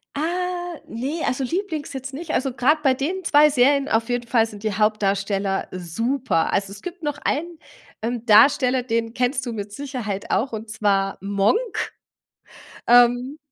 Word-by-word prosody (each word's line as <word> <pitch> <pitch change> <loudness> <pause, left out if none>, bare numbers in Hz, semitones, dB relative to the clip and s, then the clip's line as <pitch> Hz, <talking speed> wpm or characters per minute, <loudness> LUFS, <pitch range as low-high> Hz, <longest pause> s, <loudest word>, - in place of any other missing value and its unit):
Ah, 350 +1 -2
ne, 275 +8 -4
also, 265 +1 -1
lieblings 325 -1 -3
jetzt 265 0 -6
nicht 310 +3 -6
also, 265 -1 0
grad 295 +5 +2
bei 265 -2 +4
den 340 +8 -3
2 300 -1 +5
Serien 280 +1 +3
auf 225 +1 +1
jeden 245 -1 -2
Fall 230 -2 +3
sind 210 -2 -11
die 215 -2 -1
Hauptdarsteller 200 -2 0
super. 185 +4 -1
Also, 195 0 0
es 200 - -10
gibt 360 -1 -8
noch 295 -1 -2
einen, 335 +3 -2 0.4
ähm, 235 +1 -3
Darsteller, 255 +2 +5
den 230 -1 -1
kennst 250 +1 0
du 240 - -4
mit 205 -2 -6
Sicherheit 235 -6 -5
auch 235 +8 +1
und 220 0 -6
zwar 200 -2 0
„Monk“, 200 - +2 1.3
ähm, 245 +4 +4
245 Hz, 160 wpm, -22 LUFS, 215-290 Hz, 1.3 s, 2